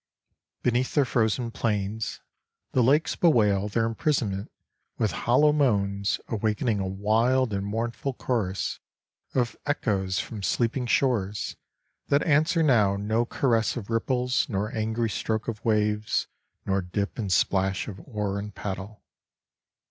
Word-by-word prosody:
Beneath 125 +1 +1
their 145 -3 +4
frozen 115 0 0
plains, 105 -1 -2 0.5
the 130 - +3
lakes 145 +7 +3
bewail 105 - +3
their 115 +2 +1
imprisonment 115 -4 -1 0.5
with 110 - +1
hollow 150 +5 +3
moans 100 -8 +1
awakening 110 0 0
a 95 - -1
wild 110 +5 +2
and 100 0 -1
mournful 115 +5 -2
chorus 105 -8 -2 0.6
of 125 -3 +1
echoes 100 -10 0
from 110 -3 -4
sleeping 120 +6 0
shores 105 -7 0 0.5
that 140 +1 +3
answer 155 +2 +3
now 105 -9 +4
no 110 +4 0
caress 115 -3 +1
of 115 -1 -6
ripples 125 +3 +1
nor 105 0 -2
angry 110 +1 0
stroke 110 +1 -2
of 110 -2 -4
waves 105 -1 +1 0.4
nor 95 0 +1
dip 100 +5 -3
and 100 -4 -2
splash 95 +1 +1
of 95 -3 -7
oar 105 -5 -3
and 105 0 -7
paddle. 100 +1 -6
110 Hz, 130 wpm, -26 LUFS, 100-125 Hz, 0.6 s, their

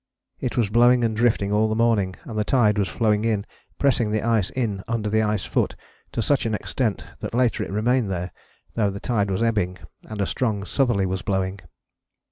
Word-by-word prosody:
It 125 - -3
was 110 -5 +1
blowing 120 +2 +5
and 110 -1 +1
drifting 110 -3 +2
all 110 +1 +3
the 110 - 0
morning, 110 -5 +2
and 115 - -8
the 105 - +1
tide 105 -3 +3
was 100 - +1
flowing 105 +1 +1
in, 110 -3 0 0.3
pressing 125 -5 +2
the 110 0 0
ice 110 -5 +2
in 110 -7 -2
under 110 -2 -1
the 110 0 +3
ice 105 -2 0
foot - - 0 0.4
to 115 - -1
such 135 -2 +1
an 110 - 0
extent 110 0 -2
that - - -5
later 125 -2 +2
it - - -6
remained 110 +3 +1
there, 90 -1 -3 0.4
though 105 -3 +1
the 100 0 -5
tide 105 -4 0
was 95 +4 0
ebbing 105 -6 0 0.3
and 110 -1 -6
a 100 - +2
strong 105 -5 -1
southerly 120 -8 +1
was 95 0 -2
blowing." 95 -1 -1
110 Hz, 205 wpm, -23 LUFS, 100-115 Hz, 0.4 s, blowing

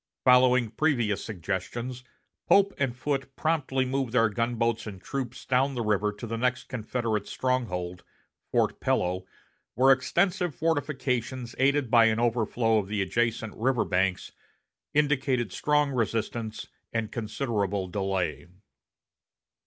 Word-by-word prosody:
Following 125 -2 +5
previous 120 -6 +1
suggestions, 110 +6 -4 0.4
Pope 200 0 +5
and 135 -4 0
Foote 135 0 -2
promptly 140 -5 0
moved 130 -2 -2
their 115 -2 +4
gunboats 115 +1 -1
and 100 -3 -7
troops 130 +2 -5
down 135 +2 +2
the 120 - -1
river 105 -1 +1
to 105 +3 -8
the 115 0 -4
next 125 +1 0
Confederate 115 -3 -2
stronghold, 90 -9 -2 0.5
Fort - - +1
Pillow, 90 +1 0 0.5
where 135 +3 +6
extensive 175 +5 0
fortifications, 130 -6 -1
aided 140 -2 +2
by 115 -2 +7
an 110 0 +2
overflow 115 -1 +2
of 100 - -4
the 105 -1 0
adjacent 115 +1 -1
river 125 -1 +1
banks, 95 0 0 0.6
indicated 135 -7 +1
strong 150 +5 +1
resistance 115 -1 -2 0.3
and 115 -2 -2
considerable 105 -4 -2
delay. 95 -2 -2
120 Hz, 120 wpm, -27 LUFS, 105-130 Hz, 0.6 s, by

